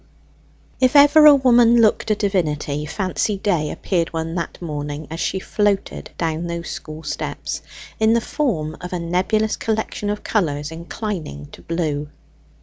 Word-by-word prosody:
If 255 Hz, +2 st, +3 dB
ever 290 Hz, +2 st, +8 dB
a 295 Hz, -, +9 dB
woman 240 Hz, -3 st, +5 dB
looked 220 Hz, 0 st, +3 dB
a 215 Hz, -, +3 dB
divinity, 150 Hz, -8 st, -1 dB
Fancy 195 Hz, +3 st, -1 dB
Day 175 Hz, -7 st, 0 dB
appeared 170 Hz, -4 st, -1 dB
one 165 Hz, 0 st, -3 dB
that 170 Hz, -2 st, -4 dB
morning 150 Hz, -2 st, -5 dB
as 165 Hz, -, -5 dB
she 190 Hz, -, -1 dB
floated 200 Hz, +1 st, -1 dB
down 165 Hz, 0 st, -2 dB
those 170 Hz, 0 st, -4 dB
school 155 Hz, +1 st, -8 dB
steps, 150 Hz, -, -4 dB, 0.4 s
in 220 Hz, 0 st, +4 dB
the 235 Hz, -, +4 dB
form 180 Hz, -, -2 dB
of 180 Hz, +1 st, -6 dB
a 180 Hz, -, -1 dB
nebulous 185 Hz, +6 st, 0 dB
collection 220 Hz, -2 st, -2 dB
of 210 Hz, 0 st, -3 dB
colours 150 Hz, -7 st, -1 dB
inclining 165 Hz, -, -6 dB
to -, -, -13 dB
blue. 150 Hz, -3 st, -2 dB
180 Hz, 150 wpm, -21 LUFS, 155-215 Hz, 0.4 s, a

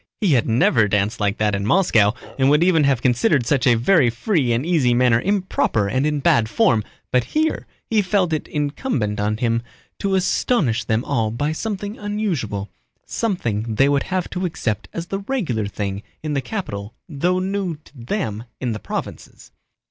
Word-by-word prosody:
He 200 Hz, -8 st, +2 dB
had 120 Hz, -3 st, +2 dB
never 115 Hz, -1 st, +3 dB
danced 105 Hz, +3 st, 0 dB
like 100 Hz, 0 st, 0 dB
that 105 Hz, -1 st, +1 dB
in 100 Hz, 0 st, -1 dB
Moscow 110 Hz, -, +3 dB, 0.3 s
and 135 Hz, 0 st, +4 dB
would 150 Hz, +3 st, +4 dB
even 165 Hz, -5 st, +4 dB
have 135 Hz, -4 st, +1 dB
considered 125 Hz, +2 st, +2 dB
such 135 Hz, +1 st, +1 dB
a 120 Hz, -, +6 dB
very 130 Hz, +1 st, +4 dB
free 130 Hz, -, 0 dB
and 120 Hz, +5 st, 0 dB
easy 145 Hz, -9 st, +2 dB
manner 120 Hz, -2 st, +3 dB
improper 185 Hz, -, 0 dB
and 130 Hz, +8 st, +1 dB
in 150 Hz, -1 st, -1 dB
bad 115 Hz, -4 st, +3 dB
form, 120 Hz, -, +3 dB, 0.3 s
but 125 Hz, -1 st, +3 dB
here 315 Hz, +1 st, -1 dB, 0.2 s
he 220 Hz, -2 st, +2 dB
felt 185 Hz, -3 st, +1 dB
it 155 Hz, -, -2 dB
incumbent 145 Hz, -, -2 dB
on 105 Hz, +1 st, 0 dB
him 115 Hz, 0 st, 0 dB, 0.4 s
to 195 Hz, -1 st, 0 dB
astonish 180 Hz, -, +1 dB
them 110 Hz, +2 st, 0 dB
all 115 Hz, -5 st, 0 dB
by 145 Hz, +7 st, -1 dB
something 205 Hz, +4 st, -4 dB
unusual, 175 Hz, -, -2 dB, 0.4 s
something 115 Hz, -, -2 dB
they 135 Hz, +6 st, +4 dB
would 140 Hz, -1 st, +2 dB
have 185 Hz, -1 st, -1 dB
to 180 Hz, -, -3 dB
accept 115 Hz, -, -3 dB
as 170 Hz, -, -5 dB
the 195 Hz, +2 st, -3 dB
regular 185 Hz, -, -2 dB
thing 100 Hz, -1 st, -4 dB, 0.2 s
in 155 Hz, -1 st, -2 dB
the 140 Hz, -, 0 dB
capital 110 Hz, -, -5 dB
though 175 Hz, +3 st, 0 dB
new 190 Hz, -2 st, -2 dB
to -, -, -18 dB
them 120 Hz, -, -3 dB
in 125 Hz, -3 st, -2 dB
the 110 Hz, -, -4 dB
provinces. -, -, -7 dB
135 Hz, 180 wpm, -21 LUFS, 115-185 Hz, 0.4 s, a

